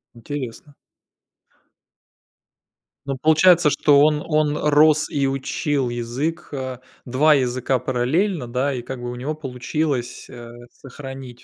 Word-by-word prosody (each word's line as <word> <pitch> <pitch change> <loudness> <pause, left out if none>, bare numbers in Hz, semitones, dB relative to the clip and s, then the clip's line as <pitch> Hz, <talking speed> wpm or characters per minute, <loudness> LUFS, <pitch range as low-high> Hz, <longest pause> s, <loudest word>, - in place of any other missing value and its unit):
Интересно. 140 +3 -7 2.3
Ну, 135 -1 -2
получается, 160 +1 +5
что 145 0 +4
он 150 0 +3
он 150 -2 +1
рос 150 +1 +3
и 140 -2 0
учил 135 0 -1
язык, 130 +8 -4
а, 130 -2 -5 0.2
2 145 +5 +4
языка 130 0 0
параллельно, 130 - -1
да, 130 +4 -1
и, 125 - -4
как 125 +1 -7
бы, 120 0 -5
у - - -6
него 145 +5 -4
получилось, 135 -1 -3
э, 120 -1 -11 0.2
сохранить 135 -2 -10
135 Hz, 120 wpm, -21 LUFS, 125-150 Hz, 2.3 s, получается